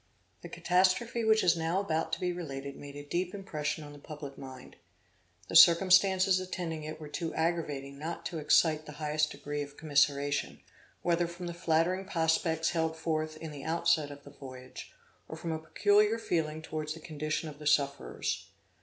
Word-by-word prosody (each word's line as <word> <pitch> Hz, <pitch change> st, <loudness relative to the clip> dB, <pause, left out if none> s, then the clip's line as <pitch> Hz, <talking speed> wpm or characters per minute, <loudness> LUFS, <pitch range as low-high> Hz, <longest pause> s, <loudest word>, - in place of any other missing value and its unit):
The -, -, -9 dB
catastrophe 190 Hz, +6 st, +2 dB
which 220 Hz, 0 st, +4 dB
is 175 Hz, -, +5 dB
now 165 Hz, +3 st, 0 dB
about 165 Hz, -5 st, -1 dB
to -, -, 0 dB
be 180 Hz, -1 st, -1 dB
related 140 Hz, -5 st, -6 dB
made 145 Hz, 0 st, -10 dB
a 145 Hz, -, -7 dB
deep 180 Hz, +5 st, -2 dB
impression 155 Hz, -6 st, -3 dB
on 145 Hz, 0 st, -10 dB
the 145 Hz, -, -12 dB
public 145 Hz, -2 st, -8 dB
mind. 130 Hz, -1 st, -11 dB, 0.7 s
The -, -, -5 dB
circumstances 185 Hz, +1 st, +7 dB
attending 175 Hz, -4 st, -4 dB
it 155 Hz, +1 st, -6 dB
were 155 Hz, -, -8 dB
too 165 Hz, +2 st, -4 dB
aggravating 150 Hz, -5 st, -2 dB
not 165 Hz, +3 st, -5 dB
to 165 Hz, -, -3 dB
excite 155 Hz, +1 st, +3 dB
the 150 Hz, -, -8 dB
highest 150 Hz, 0 st, 0 dB
degree 145 Hz, 0 st, -5 dB
of 145 Hz, 0 st, -8 dB
commiseration, 145 Hz, -1 st, +1 dB, 0.4 s
whether 175 Hz, 0 st, +2 dB
from 175 Hz, +1 st, -8 dB
the 170 Hz, -, -4 dB
flattering 170 Hz, +3 st, +1 dB
prospects 160 Hz, -2 st, +1 dB
held 160 Hz, -1 st, -1 dB
forth 155 Hz, -1 st, -2 dB
in 160 Hz, 0 st, -7 dB
the 140 Hz, -2 st, -8 dB
outset 165 Hz, -2 st, +1 dB
of 145 Hz, 0 st, -11 dB
the -, -, -12 dB
voyage, 130 Hz, -1 st, -10 dB, 0.4 s
or -, -, -6 dB
from 165 Hz, -, -4 dB
a 160 Hz, -, -2 dB
peculiar 205 Hz, +6 st, +3 dB
feeling 160 Hz, -7 st, -2 dB
towards 155 Hz, -1 st, -4 dB
the -, -, -10 dB
condition 155 Hz, +1 st, -3 dB
of 150 Hz, -1 st, -9 dB
the 150 Hz, -, -5 dB
sufferers. 140 Hz, -2 st, 0 dB
160 Hz, 180 wpm, -31 LUFS, 150-175 Hz, 0.7 s, circumstances